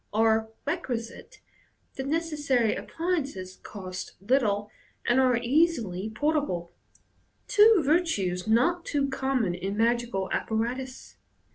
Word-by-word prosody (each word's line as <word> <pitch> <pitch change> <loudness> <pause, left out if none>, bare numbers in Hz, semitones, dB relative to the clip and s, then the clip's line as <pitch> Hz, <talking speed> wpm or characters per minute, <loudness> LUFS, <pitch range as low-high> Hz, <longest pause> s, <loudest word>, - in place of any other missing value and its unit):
are 220 +1 +2 0.2
requisite, 255 -8 -4 0.5
the 265 - -4
necessary 290 -6 +1
appliances 280 - -3
cost 185 -2 -7
little, 210 -2 +1 0.3
and 240 +2 +3
are 255 -2 +4
easily 235 - +1
portable 280 - -1 0.4
— - - -41
two 425 -4 +7
virtues 220 - +1
not 260 +11 +3
too 280 -2 0
common 265 -7 0
in 195 +3 -4
magical 235 -4 +1
apparatus. 245 +4 -3
240 Hz, 105 wpm, -27 LUFS, 210-290 Hz, 0.5 s, two